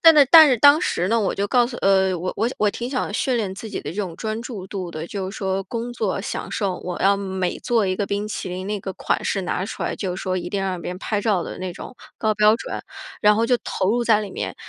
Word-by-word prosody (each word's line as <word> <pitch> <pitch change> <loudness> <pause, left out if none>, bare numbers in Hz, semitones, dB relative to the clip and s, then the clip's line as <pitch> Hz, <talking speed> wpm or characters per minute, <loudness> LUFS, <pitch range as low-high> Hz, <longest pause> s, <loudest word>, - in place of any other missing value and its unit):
但 325 -1 +8
在 290 - +8
但 320 -3 +10
是 255 - +3
当 285 +6 +7
时 180 - 0
呢， 230 +2 +3
我 195 - 0
就 200 +1 -1
告 245 -1 +4
诉 240 0 -7
呃， 190 -1 +3
我 180 +2 -3
我 225 +3 +1
我 210 -1 +3
挺 240 +3 -5
想 255 -6 -2
训 255 +3 0
练 210 -5 -1
自 220 - -7
己 - - -4
的 - - -6
这 170 - -9
种 190 -5 -3
专 220 +4 -4
注 225 -6 -7
度 185 -3 -4
的， 155 -1 -6
就 190 +2 -4
是 195 - -8
说 195 -1 -2
工 235 +3 -4
作 210 -5 -1
享 - - -4
受， 195 -4 -1
我 180 -1 -5
要 200 +1 +4
每 190 -2 -2
做 230 -4 +1
一 185 -1 -1
个 200 - -1
冰 205 +1 -2
淇 200 - -4
淋， 185 +2 -5
那 210 0 -1
个 190 0 -5
款 - - -2
式 195 - -1
拿 180 +1 -2
出 - - -6
来 - - -2
就 185 -3 -3
是 - - -6
说 185 -1 -1
一 175 - -5
定 200 - -2
要 195 - -1
让 180 - -4
别 180 - -4
人 - - -7
拍 205 0 -1
照 200 -5 +1
的 - - -7
那 185 -1 -4
种 245 - -10 0.2
高 220 -1 +1
标 210 +1 +5
准， 230 - -5 0.4
然 210 0 +5
后 225 - +2
就 245 +1 +3
投 190 +1 0
入 240 +1 +1
在 215 -2 +4
里 205 - -6
面。 - - -4
200 Hz, 310 characters per minute, -22 LUFS, 185-230 Hz, 0.4 s, 但